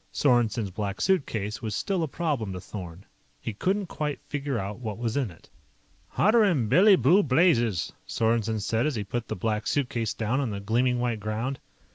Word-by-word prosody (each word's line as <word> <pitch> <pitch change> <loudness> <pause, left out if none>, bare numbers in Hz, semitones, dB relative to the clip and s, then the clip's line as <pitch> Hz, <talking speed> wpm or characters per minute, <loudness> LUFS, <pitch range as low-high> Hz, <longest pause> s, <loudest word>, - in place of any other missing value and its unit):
Sorensen's 120 -6 +2
Black 100 0 -4
Suitcase 110 - 0
was 110 -2 -3
still 195 -3 -1
a 160 - 0
problem 140 - -2
to 90 - -5
Thorn. 90 -1 -8 0.3
He 110 - -5
couldn't 195 - 0
quite 150 -5 -3
figure 140 -3 -3
out 100 +1 -4
what 110 -4 -5
was 115 -1 -2
in 135 -6 0
it. 85 - -16 0.7
"Hotter'n 200 - +4
Billy 195 - +7
Blue 170 - +5
Blazes!" 130 - +2
Sorensen 110 -1 0
said 110 +6 0
as 150 - -1
he 105 - -2
put 115 +3 -4
the - - -3
Black 105 +2 -2
Suitcase 120 -6 -1
down 115 +4 0
on 135 -4 -1
the 100 -2 -4
gleaming 120 +5 +1
white 120 -2 -1
ground. 110 +6 -3
115 Hz, 180 wpm, -27 LUFS, 105-145 Hz, 0.7 s, Billy